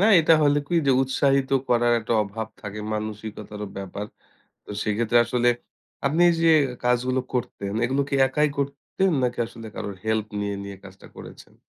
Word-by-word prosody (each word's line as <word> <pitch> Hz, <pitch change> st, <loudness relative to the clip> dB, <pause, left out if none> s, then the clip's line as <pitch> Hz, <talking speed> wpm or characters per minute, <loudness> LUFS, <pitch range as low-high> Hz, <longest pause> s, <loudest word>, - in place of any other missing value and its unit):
না 200 Hz, -, +4 dB, 0.2 s
এটা 160 Hz, +1 st, +4 dB
হইলে 145 Hz, 0 st, +4 dB
কি -, -, -1 dB
যে 135 Hz, -, +5 dB
উৎসাহিত 135 Hz, 0 st, +1 dB, 0.2 s
করার 120 Hz, 0 st, +3 dB
একটা 110 Hz, -, -3 dB
অভাব 110 Hz, +2 st, -5 dB
থাকে 105 Hz, 0 st, -7 dB
মানসিকতারও 105 Hz, -1 st, -5 dB
ব্যাপার। 100 Hz, +1 st, -5 dB, 0.6 s
তো -, -, -12 dB
সেক্ষেত্রে 110 Hz, +2 st, +2 dB
আসলে 120 Hz, +1 st, +1 dB, 0.6 s
আপনি 160 Hz, +5 st, +2 dB, 0.2 s
যে 165 Hz, -, +5 dB, 0.4 s
কাজগুলো 125 Hz, +1 st, +2 dB
করতেন, 100 Hz, -5 st, -3 dB
এগুলো 135 Hz, +3 st, +1 dB
কি -, -, -2 dB
একাই 150 Hz, +3 st, +2 dB
করতেন 140 Hz, +7 st, -1 dB
নাকি 125 Hz, -1 st, -1 dB
আসলে 115 Hz, -1 st, -10 dB
কারোর 100 Hz, -, -5 dB
হেল্প 110 Hz, -1 st, 0 dB
নিয়ে, 100 Hz, 0 st, -2 dB
নিয়ে 100 Hz, -1 st, -7 dB
কাজটা 95 Hz, 0 st, -13 dB
করেছেন? -, -, -12 dB
120 Hz, 160 wpm, -24 LUFS, 105-135 Hz, 0.6 s, যে